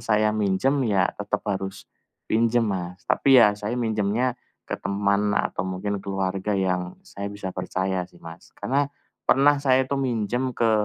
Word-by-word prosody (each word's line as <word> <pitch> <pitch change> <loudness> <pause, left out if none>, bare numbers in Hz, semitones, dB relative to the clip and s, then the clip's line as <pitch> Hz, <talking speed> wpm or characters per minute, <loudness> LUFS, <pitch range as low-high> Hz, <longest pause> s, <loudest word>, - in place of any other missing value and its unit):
saya 105 -1 +2
minjam 110 +7 +1
ya, 100 -6 +2
tetep 105 0 -3
harus 95 -2 -3 0.4
pinjam 115 +1 +2
Mas, 95 0 -4
tapi 135 +2 +4
ya 105 -4 +7
saya 105 +3 -4
minjamnya 110 +1 0 0.4
ke - - -2
teman 100 +1 +1
atau 95 - -1
mungkin 95 +2 -2
keluarga 95 +1 -2
yang 90 -2 -1
saya 100 0 -7
bisa 100 -2 -5
percaya 95 0 -2
sih 90 - -21
Mas, 85 0 -12
karena 140 +2 0 0.4
pernah 145 +1 +5
saya 130 -2 +3
itu 135 +1 -2
minjam 125 0 -1
ke, 115 -1 +2
105 Hz, 155 wpm, -24 LUFS, 95-120 Hz, 0.4 s, ya